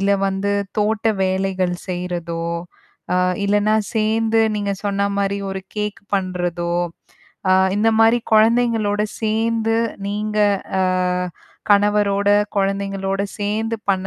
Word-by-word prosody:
இல்ல 200 Hz, +1 st, +1 dB, 0.2 s
வந்து 195 Hz, +1 st, -1 dB, 0.3 s
தோட்ட 215 Hz, +1 st, +1 dB, 0.2 s
வேலைகள் 185 Hz, -1 st, 0 dB
செய்யுறதோ, 175 Hz, -2 st, -3 dB, 0.7 s
அ -, -, +2 dB, 0.3 s
இல்லன்னா 205 Hz, +1 st, +3 dB, 0.2 s
சேந்து, 225 Hz, +1 st, +2 dB
நீங்க 205 Hz, -1 st, -1 dB
சொன்னா 200 Hz, 0 st, +1 dB
மாரி 200 Hz, 0 st, 0 dB
ஒரு 190 Hz, 0 st, -5 dB
கேக் 210 Hz, 0 st, -3 dB, 0.2 s
பண்றதோ, 175 Hz, -2 st, -2 dB, 0.8 s
ஆ -, -, +6 dB, 0.2 s
இந்த 220 Hz, +2 st, +3 dB
மாரி 225 Hz, +2 st, +5 dB
கொழந்தைங்களோட 220 Hz, -2 st, +3 dB, 0.2 s
சேந்து 225 Hz, 0 st, +1 dB, 0.3 s
நீங்க 210 Hz, +1 st, -3 dB, 0.4 s
அ -, -, +3 dB, 0.9 s
கணவரோட, 205 Hz, 0 st, +3 dB, 0.3 s
கொழந்தைங்களோட, 195 Hz, 0 st, -1 dB, 0.2 s
சேந்து 220 Hz, +2 st, -1 dB
பண்ண 190 Hz, -1 st, 0 dB
205 Hz, 105 wpm, -20 LUFS, 195-215 Hz, 0.9 s, ஆ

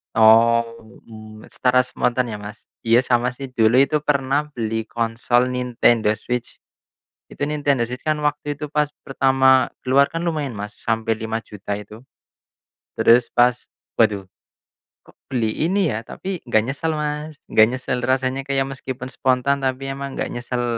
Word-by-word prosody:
Oh, 115 Hz, +1 st, +5 dB, 0.3 s
mmm, 110 Hz, -1 st, -12 dB
secara 125 Hz, 0 st, +2 dB
spontan 125 Hz, -1 st, -1 dB
ya, 105 Hz, -, -5 dB
Mas? 105 Hz, +2 st, -11 dB, 0.2 s
Iya, 115 Hz, +2 st, +5 dB
sama 125 Hz, 0 st, +1 dB
sih 135 Hz, +1 st, -8 dB
dulu 120 Hz, +1 st, +4 dB
itu 150 Hz, +2 st, +2 dB
pernah 140 Hz, +1 st, +1 dB
beli 110 Hz, -1 st, -2 dB
konsol 120 Hz, +2 st, 0 dB
Nintendo 120 Hz, -3 st, +2 dB
Switch. 125 Hz, +2 st, -5 dB, 0.7 s
Itu 145 Hz, -, -3 dB
Nintendo 145 Hz, -5 st, 0 dB
Switch 125 Hz, +2 st, -7 dB
kan 155 Hz, -1 st, 0 dB
waktu 150 Hz, -1 st, -2 dB
itu 150 Hz, -, -4 dB
pas 150 Hz, 0 st, 0 dB, 0.2 s
pertama 130 Hz, -1 st, +3 dB, 0.2 s
keluar 140 Hz, +2 st, +4 dB
kan 165 Hz, -, -3 dB
lumayan, 150 Hz, -5 st, -2 dB
Mas, 105 Hz, +1 st, -7 dB
sampai 115 Hz, -1 st, -1 dB
Rp5.000.000 110 Hz, -2 st, -5 dB
itu. 105 Hz, +3 st, -12 dB, 0.9 s
Terus 120 Hz, +1 st, +4 dB
pas, 125 Hz, +1 st, +4 dB, 0.4 s
"Waduh, 100 Hz, -2 st, +1 dB, 0.8 s
kok -, -, -21 dB
beli 115 Hz, -4 st, -1 dB, 0.2 s
ini 190 Hz, -3 st, +1 dB
ya," 110 Hz, +1 st, -5 dB
tapi 190 Hz, -1 st, -5 dB
nggak 110 Hz, -3 st, +3 dB
nyesel, 155 Hz, +3 st, -2 dB
Mas, 150 Hz, +1 st, -4 dB, 0.2 s
nggak 110 Hz, 0 st, +6 dB
nyesel 125 Hz, +1 st, -3 dB
rasanya 130 Hz, +2 st, -1 dB
kayak 135 Hz, -1 st, +1 dB
meskipun 130 Hz, -1 st, -6 dB
spontan 130 Hz, +2 st, +1 dB
tapi 135 Hz, 0 st, -2 dB
emang 140 Hz, 0 st, -6 dB
nggak -, -, -3 dB
nyesel, 120 Hz, 0 st, -3 dB
125 Hz, 150 wpm, -21 LUFS, 115-140 Hz, 0.9 s, nggak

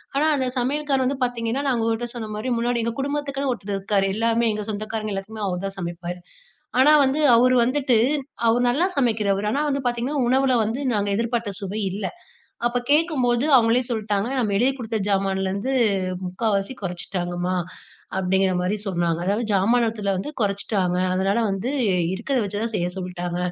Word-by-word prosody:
ஆனா 290 Hz, -, +2 dB
அந்த 260 Hz, -, 0 dB
சமையல்கார் 275 Hz, 0 st, 0 dB
வந்து 270 Hz, +1 st, -1 dB
பார்த்தீங்கன்னா, 240 Hz, +2 st, -2 dB
நான் 245 Hz, -3 st, +1 dB
உங்கட்ட 230 Hz, +1 st, -1 dB
சொன்ன 220 Hz, -2 st, -5 dB
மாரி 245 Hz, +4 st, -3 dB
முன்னாடி 240 Hz, 0 st, 0 dB
எங்க 230 Hz, 0 st, -2 dB
குடும்பத்துக்குன்னு 280 Hz, -1 st, -2 dB
ஒருத்தர் 200 Hz, -3 st, -5 dB
இருக்காரு, 195 Hz, 0 st, +1 dB
எல்லாமே 230 Hz, +1 st, +2 dB
எங்க 210 Hz, -, -3 dB
சொந்தக்காரங்க 215 Hz, 0 st, -4 dB
எல்லாத்துக்குமே 210 Hz, +2 st, -5 dB
அவர் 180 Hz, +1 st, -3 dB
தான் 195 Hz, -, -8 dB
சமைப்பாரு. 175 Hz, 0 st, -5 dB, 0.6 s
ஆனா 290 Hz, +3 st, +7 dB
வந்து 270 Hz, +3 st, +1 dB, 0.2 s
அவரு 255 Hz, +2 st, +5 dB
வந்துட்டு 260 Hz, 0 st, +1 dB, 0.5 s
அவரு 235 Hz, +2 st, +3 dB
நல்லா 285 Hz, +9 st, +2 dB
சமைக்கிறவர். 210 Hz, -5 st, +1 dB
ஆனா 285 Hz, -, 0 dB
வந்து 280 Hz, -1 st, -1 dB
பார்த்தீங்கன்னா 245 Hz, +4 st, -1 dB
உணவுல 260 Hz, 0 st, +3 dB
வந்து 225 Hz, +5 st, -2 dB
நாங்க 205 Hz, -1 st, 0 dB
எதிர்பார்த்த 230 Hz, -2 st, -1 dB
சுவை 200 Hz, +3 st, -4 dB
இல்ல. 200 Hz, +1 st, -4 dB, 0.6 s
அப்ப 240 Hz, +1 st, +1 dB
கேட்கும்போது 275 Hz, -6 st, +2 dB
அவங்களே 230 Hz, +1 st, +4 dB
சொல்ட்டாங்க, 210 Hz, -1 st, -1 dB
"நம்ம 215 Hz, -5 st, 0 dB
எழுதி 255 Hz, +4 st, +3 dB
குடுத்த 225 Hz, -2 st, -3 dB
ஜாமான்லருந்து 195 Hz, +4 st, 0 dB, 0.5 s
முக்காவாசி 200 Hz, +3 st, -1 dB
கொறைச்சிட்டாங்கமா" 180 Hz, 0 st, -3 dB, 0.6 s
அப்டிங்குற 190 Hz, 0 st, +2 dB
மாரி 185 Hz, +4 st, 0 dB
சொன்னாங்க. 170 Hz, -3 st, 0 dB
அதாவது 210 Hz, +4 st, +1 dB
ஜாமானத்துல 220 Hz, +1 st, +2 dB
வந்து 195 Hz, +11 st, -4 dB
கொறைச்சிட்டாங்க. 200 Hz, -3 st, 0 dB, 0.2 s
அதனால 195 Hz, +3 st, +1 dB
வந்து 195 Hz, +6 st, -2 dB, 0.4 s
இருக்கறத 250 Hz, +5 st, -1 dB
வச்சுதான் 210 Hz, +3 st, -3 dB
செய்ய 175 Hz, -3 st, 0 dB
சொல்ட்டாங்க. 180 Hz, -1 st, -4 dB
220 Hz, 155 wpm, -23 LUFS, 195-245 Hz, 0.6 s, ஆனா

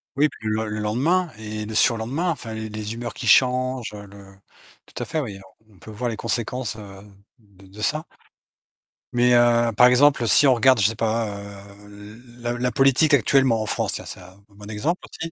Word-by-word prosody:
Oui, 150 Hz, +2 st, +3 dB
puis 110 Hz, -, -9 dB
le 110 Hz, +1 st, -1 dB
le 105 Hz, 0 st, -4 dB
lendemain 145 Hz, +13 st, 0 dB
et 105 Hz, -1 st, -6 dB
le 110 Hz, +1 st, -7 dB
surlendemain, 120 Hz, +11 st, +1 dB
enfin, 115 Hz, -7 st, -6 dB
les 110 Hz, 0 st, -6 dB
les 105 Hz, 0 st, -6 dB
humeurs 120 Hz, 0 st, -6 dB
qui 120 Hz, -, -6 dB
changent, 130 Hz, -1 st, +2 dB
heu, 100 Hz, -1 st, -10 dB
le 100 Hz, 0 st, -15 dB, 0.5 s
tout -, -, -7 dB
à -, -, -5 dB
fait, 160 Hz, -, -3 dB
oui, 105 Hz, -9 st, -6 dB, 0.3 s
on 105 Hz, -, -22 dB
on -, -, -22 dB
peut 110 Hz, -, -12 dB
voir 120 Hz, +3 st, -3 dB
les 115 Hz, -, -4 dB
conséquences, 120 Hz, -1 st, -3 dB
heu, 100 Hz, -2 st, -11 dB, 0.4 s
de 100 Hz, -3 st, -21 dB
de 105 Hz, +3 st, -12 dB
ça. 155 Hz, +7 st, 0 dB, 1.1 s
Mais 125 Hz, 0 st, +3 dB
heu, 120 Hz, -1 st, +3 dB
par 125 Hz, -, +8 dB
exemple, 125 Hz, -1 st, +4 dB
si 145 Hz, -, +5 dB
on 130 Hz, -, +6 dB
regarde, 130 Hz, +1 st, +4 dB
je 95 Hz, -, +5 dB
sais 115 Hz, -, -3 dB
pas, 115 Hz, 0 st, -1 dB
heu, 100 Hz, 0 st, -12 dB, 0.3 s
l 120 Hz, 0 st, -18 dB
la 120 Hz, 0 st, -2 dB
la 125 Hz, +1 st, -1 dB
politique 135 Hz, +3 st, +3 dB
actuellement 130 Hz, -3 st, +3 dB
en -, -, -3 dB
France, -, -, -2 dB
tiens, -, -, -6 dB
c'est -, -, -9 dB
un 90 Hz, +1 st, -15 dB
bon 105 Hz, 0 st, -13 dB
exemple 145 Hz, +12 st, -2 dB
aussi. 165 Hz, 0 st, -7 dB
115 Hz, 210 wpm, -22 LUFS, 105-130 Hz, 1.1 s, par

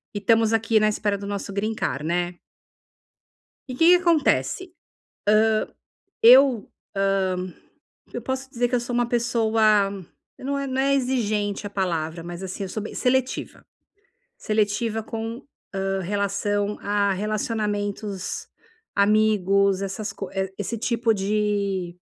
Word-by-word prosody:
e -, -, -1 dB
estamos 225 Hz, +1 st, +3 dB
aqui 225 Hz, 0 st, +3 dB
na 215 Hz, 0 st, +3 dB
espera 205 Hz, -1 st, -1 dB
do 200 Hz, 0 st, -7 dB
nosso 200 Hz, -1 st, -4 dB
green 215 Hz, +2 st, -1 dB
card, 145 Hz, -7 st, -2 dB
né. 175 Hz, +1 st, -1 dB, 1.3 s
E -, -, -4 dB
o -, -, -7 dB
que 325 Hz, -, +4 dB
que 360 Hz, -, +9 dB
acontece? 340 Hz, +1 st, +2 dB
Hã. 365 Hz, -, -19 dB, 1.5 s
Eu, 250 Hz, -1 st, +7 dB, 0.5 s
hã, 185 Hz, -1 st, -2 dB, 0.6 s
eu -, -, -4 dB
posso 265 Hz, 0 st, -3 dB
te -, -, -37 dB
dizer 245 Hz, 0 st, +1 dB
que 250 Hz, -, -2 dB
eu 240 Hz, -, +2 dB
sou 240 Hz, +1 st, -5 dB
uma 240 Hz, 0 st, +1 dB
pessoa, 225 Hz, -4 st, +2 dB, 0.5 s
não 280 Hz, +2 st, -2 dB
é 275 Hz, -, -3 dB
não 260 Hz, 0 st, -1 dB
é 275 Hz, +1 st, +3 dB
exigente 215 Hz, -6 st, -1 dB
a -, -, -5 dB
palavra, 165 Hz, -4 st, -2 dB
mas 175 Hz, +2 st, -7 dB
assim, 190 Hz, +2 st, -5 dB
eu -, -, -5 dB
sou 215 Hz, +3 st, -4 dB
bem 215 Hz, -, -7 dB
seletiva. 260 Hz, 0 st, -1 dB, 0.7 s
Seletiva 215 Hz, +1 st, 0 dB
com, 225 Hz, +3 st, -5 dB, 0.3 s
hã, 195 Hz, 0 st, -1 dB
relação 200 Hz, +2 st, -1 dB
a 200 Hz, -1 st, +1 dB
relacionamentos, 205 Hz, -1 st, -3 dB, 0.5 s
amigos, 200 Hz, -2 st, +3 dB
essas 205 Hz, +2 st, -4 dB
co 195 Hz, -1 st, -6 dB, 0.3 s
esse 210 Hz, +3 st, -3 dB
tipo 235 Hz, -1 st, +1 dB
de 200 Hz, -3 st, -1 dB
210 Hz, 140 wpm, -24 LUFS, 195-235 Hz, 1.5 s, que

